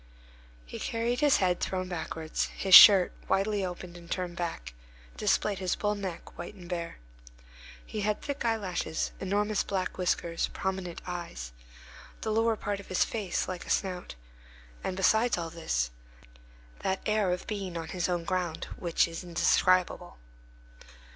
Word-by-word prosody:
He - - -8
carried 235 +2 -1
his 295 -2 +5
head 180 -2 +1
thrown 185 -1 -2
backwards; 160 -2 -3
his 190 -1 0
shirt, 190 -2 +11 0.2
widely 195 +1 +1
opened 180 -1 -6
and 170 -1 -12
turned 180 -2 -3
back, 115 - -4 0.4
displayed 200 - +1
his 185 -2 0
bull 210 0 0
neck, 190 -4 -7
white - - -7
and 180 -3 -12
bare. 170 -1 -4 0.9
He 215 - -4
had 210 0 0
thick 285 -2 -4
eyelashes, 200 -8 -1
enormous 205 +2 0
black 190 -1 -3
whiskers, 170 -2 0
prominent 190 -2 -4
eyes, 170 - -6 0.7
the 220 - -2
lower 225 +1 +2
part 205 -1 -3
of 200 - -11
his 185 - +2
face 205 -6 -2
like 185 -1 -6
a - - -9
snout; 180 - -1 0.7
and 185 - -3
besides 220 +4 +3
all 165 -1 -4
this, - - -1 0.9
that 190 0 -1
air 210 -3 +2
of 180 - -3
being 195 -5 -4
on 165 -1 -5
his 180 -1 -1
own 175 -1 -1
ground, 175 -2 -2
which 170 -1 +2
is 165 +1 -7
indescribable. 180 - +2
185 Hz, 150 wpm, -29 LUFS, 175-205 Hz, 0.9 s, shirt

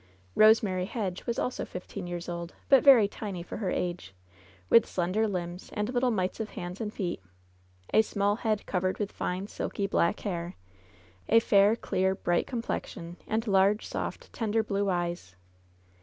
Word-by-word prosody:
Eosemary 210 -4 +4
Hedge 195 -5 -4
was 235 - -1
also 250 - -2
fifteen 180 +1 -7
years 175 0 -5
old, 170 0 -5
but 270 -2 +6
very 255 -7 +8
tiny 200 -4 -6
for - - -7
her 200 -4 -2
age, 175 - -3 0.5
with 230 - +6
slender 185 +5 0
limbs 180 -2 -4
and 210 +3 -2
little 250 0 +2
mites 190 -4 -1
<rf 220 - -2
hands 180 +4 -6
and 210 -2 -3
feet, 180 - -3 0.7
a 220 - +7
small 205 -1 0
head 215 -3 -1
covered 185 0 -1
with 205 -1 -3
fine, 180 +2 -3
silky 200 -1 -3
black 195 -1 +1
hair, 175 -3 -4 0.7
a 230 - +7
fair, 205 -1 +4
clear, 190 -4 0
bright 175 -2 0
complexion, 180 -7 -4
and 220 +1 -1
large, 200 0 +3
soft, - - -5
tender 220 -1 0
blue 200 -1 -1
eyes. 175 - -2
200 Hz, 160 wpm, -29 LUFS, 180-220 Hz, 0.7 s, very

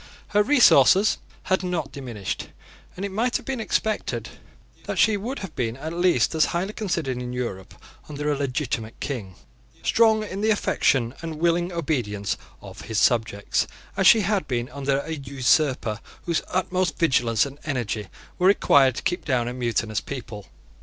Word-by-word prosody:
Her 210 - +3
resources 210 - +5 0.2
had 190 - +1
not 180 -6 -2
diminished; 120 -8 -5 0.5
and 190 - -4
it 200 - -4
might 235 +5 +1
have - - -13
been 265 -2 -3
expected 220 -1 -1 0.6
that - - -4
she 220 -1 +4
would 235 +7 -4
have 160 - -12
been 115 -1 -2
at 160 +4 -5
least 175 -8 +2
as 160 -1 +4
highly 185 +5 -2
considered 170 - -2
in 125 0 -5
Europe 115 -7 -5 0.3
under 150 0 -2
a - - +1
legitimate 125 -5 -3
King, 110 -10 -5 0.5
strong 220 -1 +4
in 200 -1 -5
the 220 - +2
affection 135 - +2
and 165 -1 -5
willing 170 +2 +1
obedience 120 - -2 0.3
of - - -10
his 110 -1 -4
subjects, 110 -4 +1 0.3
as 195 - +3
she 225 +1 +7
had 200 -4 0
been 120 -2 -2
under 140 +1 -1
an 160 -2 -6
usurper 130 -4 +1 0.2
whose 170 -2 0
utmost 185 -1 -1
vigilance 120 -8 +2
and 140 +1 -9
energy 120 -8 -3 0.3
were 180 - +4
required 140 - +5
to - - -5
keep 175 0 -1
down 125 -5 0
a 120 - -3
mutinous 115 -3 -1
people. 115 -7 -7
145 Hz, 165 wpm, -24 LUFS, 120-185 Hz, 0.6 s, she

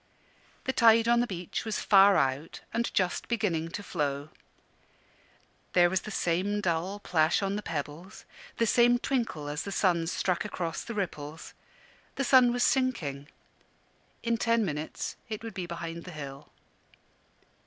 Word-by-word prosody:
The 260 - -1
tide 230 -1 +5
on 235 0 +4
the 240 - +1
beach 180 -4 -4
was 220 -2 -2
far 195 -1 +6
out 135 +3 -1
and 235 +1 0
just 185 -2 0
beginning 175 -9 -1
to 205 +4 -6
flow. 145 -5 -2 1.4
There 175 -1 +5
was 190 -1 +1
the - - -8
same 195 +2 0
dull 180 +1 -1
plash 165 -1 +2
on 195 +1 -1
the 210 - -3
pebbles, 160 +4 -6 0.3
the 230 - +2
same 240 +2 +4
twinkle 235 - -2
as 145 +2 -3
the 200 - -5
sun 175 -4 +1
struck 180 0 0
across 175 -5 -4
the 230 - -6
ripples. 160 -6 -5 0.6
The 275 - -1
sun 255 -1 +6
was 245 0 +1
sinking; 165 - 0 1.0
in 235 0 +1
ten 230 -1 +2
minutes 150 -2 -4
it 215 0 -5
would 225 -2 -6
be 180 -2 -5
behind 170 0 -6
the 180 - -8
hill. 140 -1 -8
185 Hz, 155 wpm, -29 LUFS, 165-225 Hz, 1.4 s, far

